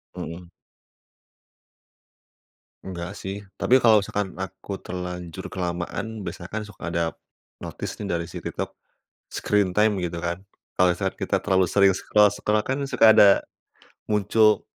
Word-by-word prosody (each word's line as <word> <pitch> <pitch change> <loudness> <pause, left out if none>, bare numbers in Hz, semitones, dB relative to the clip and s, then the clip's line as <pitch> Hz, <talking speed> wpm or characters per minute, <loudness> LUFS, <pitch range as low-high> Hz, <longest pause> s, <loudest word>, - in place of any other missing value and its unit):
Mhm. 85 +1 -7 2.3
Enggak, 90 -1 -6
sih. 100 +2 -6 0.2
Tapi 125 - +4
kalau 110 -3 +7
misalkan 100 -1 -3
aku 95 +1 -6
terlanjur 90 -2 -6
kelamaan, 95 +4 -4
biasanya 85 -1 -6
kan 110 +2 -4
suka 105 -4 -9
ada 85 0 0 0.5
notice - - -6
nih 105 - -4
dari 85 -2 -1
si 85 - -8
TikTok, - - -4 0.6
screen 100 -3 +1
time 105 +2 +3
gitu 85 -2 -3
kan. 85 +3 -4 0.3
Kalau 90 -1 +4
saat 85 - -3
kita - - -1
terlalu 95 -2 +2
sering 95 +1 +4
scroll-scroll 105 +1 +2
kan 130 +5 -2
suka 120 -5 +5
ada 100 - +9 0.8
muncul 105 0 +3
95 Hz, 130 wpm, -24 LUFS, 90-105 Hz, 2.3 s, ada